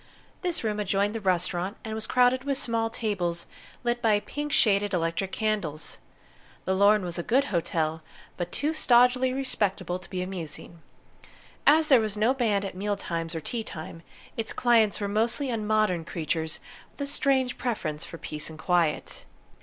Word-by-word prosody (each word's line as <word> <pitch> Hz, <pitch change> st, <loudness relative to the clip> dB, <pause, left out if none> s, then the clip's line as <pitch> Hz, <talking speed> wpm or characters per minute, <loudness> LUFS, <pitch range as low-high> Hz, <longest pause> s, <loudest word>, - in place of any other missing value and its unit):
This 355 Hz, -7 st, -2 dB
room 210 Hz, -1 st, -1 dB
adjoined 200 Hz, +1 st, +1 dB
the 225 Hz, -, -4 dB
restaurant, 185 Hz, +1 st, 0 dB
and 220 Hz, -, -4 dB
was 220 Hz, 0 st, -4 dB
crowded 250 Hz, +1 st, +4 dB
with 275 Hz, -1 st, -1 dB
small 230 Hz, -3 st, 0 dB
tables 185 Hz, -7 st, -2 dB, 0.4 s
lit 240 Hz, 0 st, 0 dB
by 215 Hz, -3 st, +4 dB
pink 295 Hz, +7 st, -5 dB
shaded 205 Hz, -7 st, +3 dB
electric 165 Hz, +3 st, -1 dB
candles. 200 Hz, -10 st, -2 dB, 0.7 s
The 190 Hz, -, +1 dB
Lorne 200 Hz, +1 st, +5 dB
was 175 Hz, -1 st, -2 dB
a -, -, +1 dB
good 255 Hz, +10 st, +3 dB
hotel, 160 Hz, -2 st, 0 dB, 0.3 s
but 175 Hz, 0 st, -4 dB
too 300 Hz, +2 st, -1 dB
stodgily 250 Hz, -2 st, +4 dB
respectable 200 Hz, -9 st, -1 dB
to 180 Hz, -, -14 dB
be 180 Hz, -1 st, -2 dB
amusing. 170 Hz, -2 st, -6 dB, 0.9 s
As 310 Hz, +2 st, +6 dB
there 260 Hz, -5 st, +7 dB
was 215 Hz, -1 st, -3 dB
no 225 Hz, +5 st, +3 dB
band 215 Hz, -6 st, +1 dB
at 195 Hz, -, -4 dB
meal 205 Hz, +3 st, -1 dB
times 165 Hz, -3 st, -4 dB
or 160 Hz, -, -3 dB
tea 230 Hz, +7 st, -3 dB
time, 165 Hz, -3 st, -8 dB, 0.3 s
its 225 Hz, -1 st, -3 dB
clients 230 Hz, -4 st, +3 dB
were 205 Hz, -, -1 dB
mostly 230 Hz, +7 st, +1 dB
unmodern 215 Hz, -5 st, +1 dB
creatures 160 Hz, -1 st, -3 dB, 0.3 s
with -, -, -12 dB
a 285 Hz, -, -7 dB
strange 265 Hz, -3 st, +1 dB
preference 170 Hz, -11 st, -2 dB
for 165 Hz, -, -8 dB
peace 150 Hz, -1 st, -5 dB
and 160 Hz, -, -10 dB
quiet. 170 Hz, -2 st, 0 dB
205 Hz, 170 wpm, -27 LUFS, 175-240 Hz, 0.9 s, there